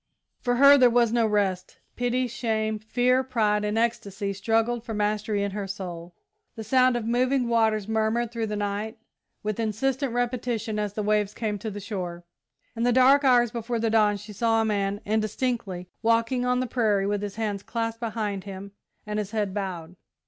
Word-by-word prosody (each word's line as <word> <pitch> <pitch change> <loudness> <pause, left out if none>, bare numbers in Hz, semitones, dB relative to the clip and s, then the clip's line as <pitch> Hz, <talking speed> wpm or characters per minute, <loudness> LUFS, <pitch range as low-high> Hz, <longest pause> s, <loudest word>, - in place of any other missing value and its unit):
For 245 0 0
her 280 +2 +7
there 250 -1 +7
was 235 -1 +3
no 235 -2 +3
rest. 195 -3 -1 0.2
Pity, 245 +1 0
shame, 220 -2 -2
fear, 245 +4 +2
pride, 215 -5 +1
and 210 +1 -1
ecstasy 200 -4 -1
struggled 225 +4 0
for 225 -2 -5
mastery 210 0 0
in 200 - -2
her 200 0 -4
soul. 175 -3 -7 0.4
The 220 - -6
sound 255 +2 +3
of 230 - -4
moving 250 +2 +1
waters 220 -3 +2
murmured 220 +1 0
through 230 -2 -2
the 210 - -3
night 205 +2 -3 0.5
with 215 +1 -3
insistent 250 +5 -1
repetition 240 -3 -2
as 210 -1 -2
the 210 - -3
waves 210 -1 +1
came 210 -3 -2
to 220 - -4
the 205 0 -6
shore. 180 -4 -5 0.5
In 230 - -4
the 245 +1 +3
dark 260 +3 +5
hours 245 -3 +4
before 235 0 -3
dawn 220 -2 +2
she 210 +1 -10
saw 225 +2 +2
a 225 - +2
man, 205 -1 -1
indistinctly, 215 -3 -2
walking 230 +2 +1
on 250 0 +2
the - - 0
prairie, 215 -5 +1
with 205 0 -1
his 205 -1 -5
hands 210 -3 -2
clasped 230 +1 -3
behind 215 -4 -3
him 200 0 -8 0.3
and 210 0 -2
his 205 -2 -3
head 210 -3 -2
bowed. 180 -4 -5
220 Hz, 185 wpm, -26 LUFS, 205-240 Hz, 0.5 s, her